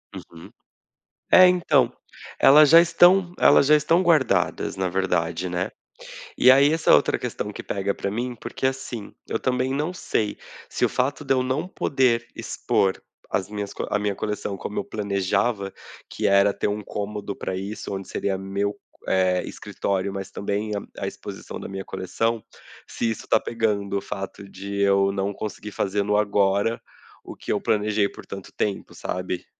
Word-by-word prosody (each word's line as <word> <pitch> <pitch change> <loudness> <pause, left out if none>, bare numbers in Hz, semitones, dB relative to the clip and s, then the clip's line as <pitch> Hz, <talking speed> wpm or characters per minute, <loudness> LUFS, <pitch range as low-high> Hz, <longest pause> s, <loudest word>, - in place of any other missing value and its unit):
Uhum. 80 -1 -11 0.8
É, 185 - +9
então, 150 -9 +3 0.5
elas 150 +1 +7
já 165 - +10
estão 175 +1 +4
elas - - +6
já 150 - +6
estão 165 +4 +2
guardadas 155 - +2
na 95 -1 0
verdade, 90 -1 -1
né, 90 +1 -2 0.7
e 125 - +6
aí 140 +3 +5
essa 160 -1 +3
outra - - +4
questão - - -4
que - - -7
pega 100 0 -2
pra 100 - -3
mim, 120 +3 -3
porque, 120 - -5
assim, 130 -5 -3 0.2
eu - - -1
também 130 +1 0
não 150 +6 -1
sei 110 -11 -2 0.3
se - - -3
o - - +4
fato 135 +3 -1
de 135 - +2
eu 130 -1 +1
não 135 +7 -1
poder 125 -9 +1
expor 95 -1 0 0.3
as 95 +1 -1
minhas 105 -1 -5 0.2
a 105 - +1
minha 105 -1 -1
coleção 105 -1 -3
como 105 - -4
eu - - -2
planejava, 100 +1 -1 0.4
que - - -1
era 100 0 +4
ter - - -2
um 105 +1 -2
cômodo 105 0 -5
pra 95 - -4
isso, 100 +2 -5
onde 95 -1 -5
seria 95 -1 -2
meu, 100 +2 -2 0.3
eh, 90 -1 +2
escritório, 100 0 -3
mas 95 -1 -6
também 100 +2 -3
a 100 - -7
a - - -1
exposição - - -8
da - - -7
minha 95 0 -6
coleção, 115 +5 -2 0.4
se 115 - -2
isso 110 - -5
está - - +3
pegando 105 -4 -1
o - - -2
fato 95 +1 -7
de 100 +2 -7
eu 100 0 +3
não 100 +1 -2
conseguir 105 0 -6
fazer 100 0 -1
no 105 +1 +1
agora 100 +1 +1 0.4
o - - -9
que - - -5
eu - - -1
planejei 105 -1 +1
por - - -12
tanto 100 -1 -9
tempo, 100 -2 -3
sabe. 90 -1 -4
105 Hz, 170 wpm, -24 LUFS, 100-125 Hz, 0.8 s, já